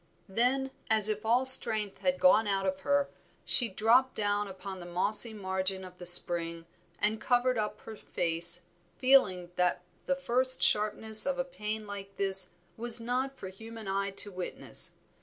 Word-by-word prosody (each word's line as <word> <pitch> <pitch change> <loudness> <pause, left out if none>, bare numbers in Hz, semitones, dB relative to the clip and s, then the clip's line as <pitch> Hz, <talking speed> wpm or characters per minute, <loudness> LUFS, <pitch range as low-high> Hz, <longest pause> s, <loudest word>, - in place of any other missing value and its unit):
Then, 255 +6 -2 0.2
as 215 -1 +6
if 215 +1 -5
all 245 +3 +1
strength 220 -6 +6
had 275 0 -2
gone 225 -6 +2
out 195 -1 -3
of 190 0 -4
her, 285 +6 -2 0.3
she 240 -3 +1
dropped 235 +6 0
down 205 0 -3
upon 190 0 -10
the 175 - -11
mossy 205 +6 -1
margin 190 -2 -4
of 180 0 -16
the 180 - -5
spring 170 -1 +4 0.3
and 215 +1 -3
covered 250 +1 -1
up 215 -2 -5
her 220 - -11
face, 170 -2 0 0.3
feeling 185 -10 +1
that 180 0 -2 0.2
the 275 - -1
first 260 -1 +3
sharpness 215 +2 0
of 275 -1 -3
a 265 - -2
pain 215 -3 -7
like 200 -1 -11
this 190 -2 +1 0.3
was 235 0 +2
not 255 +3 -5
for 190 - -10
human 225 +2 -12
eyes 195 0 -4
to 205 - -9
witness. 180 -1 0
210 Hz, 165 wpm, -28 LUFS, 190-240 Hz, 0.3 s, as